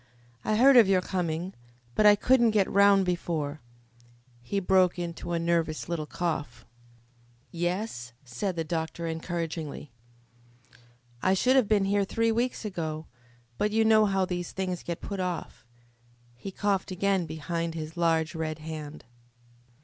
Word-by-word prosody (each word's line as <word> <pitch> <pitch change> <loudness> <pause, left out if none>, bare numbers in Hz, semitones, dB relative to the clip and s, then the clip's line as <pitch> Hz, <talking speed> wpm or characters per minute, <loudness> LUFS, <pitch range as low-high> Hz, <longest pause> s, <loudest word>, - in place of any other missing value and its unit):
I 215 - +1
heard 260 +4 +6
of 230 -5 +8
your 190 -1 +4
coming, 180 0 -2 0.4
but 210 - +4
I 205 - +8
couldn't 240 +2 +4
get 195 - +3
round 200 -1 +5
before 160 -5 -2 0.4
" 120 0 -28 0.3
He 200 +12 -2
broke 185 -1 +3
into 175 0 -5
a 170 - +1
nervous 165 -2 0
little 165 -3 -3
cough. 155 -8 -3 0.9
"Yes?" 175 - -3
said 130 +10 -3
the 165 - -1
doctor 160 +1 -3
encouragingly. 165 -3 -4 1.3
"I 190 +1 +3
should 255 +7 +3
have 260 -6 +4
been 205 -2 +3
here 200 +1 +2
three 230 +3 0
weeks 235 +1 -1
ago, 160 -5 -4 0.5
but 210 - +2
you 220 +1 +2
know 215 -1 +5
how 195 -1 +1
these 175 -1 -4
things 185 -2 -3
get 170 -1 -5
put 200 -1 -5
off." 180 -9 -4 0.7
He 120 - -7
coughed 200 0 -1
again 190 -1 0
behind 165 +1 -3
his 155 0 -6
large 165 -2 +1
red 155 -1 -3
hand. 155 -2 -8
175 Hz, 150 wpm, -28 LUFS, 160-200 Hz, 1.3 s, of